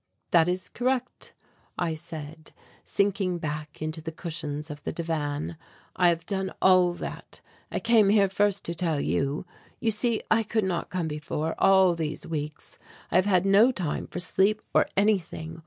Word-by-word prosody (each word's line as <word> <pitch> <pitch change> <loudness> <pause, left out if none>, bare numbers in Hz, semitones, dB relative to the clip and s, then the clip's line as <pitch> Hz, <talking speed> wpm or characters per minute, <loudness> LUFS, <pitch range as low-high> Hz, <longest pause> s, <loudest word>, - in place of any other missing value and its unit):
"That 170 0 +5
is 180 +1 -2
correct," 255 0 -2 0.4
I 170 -2 0
said, 155 -1 -8 0.3
sinking 195 -3 0
back 150 -2 -5
into 155 +1 -4
the 160 +1 -5
cushions 155 -2 -5
of 150 0 -8
the - - -2
divan. 155 -1 -3 0.4
"I 180 -1 +5
have 165 -1 -1
done 190 0 -2
all 180 -2 +5
that. - - -7 0.3
I - - -1
came 230 -3 +4
here 200 -1 +5
first 200 +1 +1
to 170 - -2
tell 165 -3 0
you. 140 +3 -1 0.3
You 225 - +1
see 225 +1 +1
I 225 - +5
could 220 0 0
not 180 -3 -2
come 180 -3 -2
before, 150 +1 -3
all 190 -2 +5
these 160 -2 -4
weeks, 150 -1 -6 0.3
I - - -1
have 185 +2 +3
had 185 -2 +3
no 205 +6 +6
time 180 -11 -3
for - - -6
sleep 195 +4 +2
or - - +4
anything. 170 -5 0
175 Hz, 170 wpm, -27 LUFS, 155-195 Hz, 0.4 s, no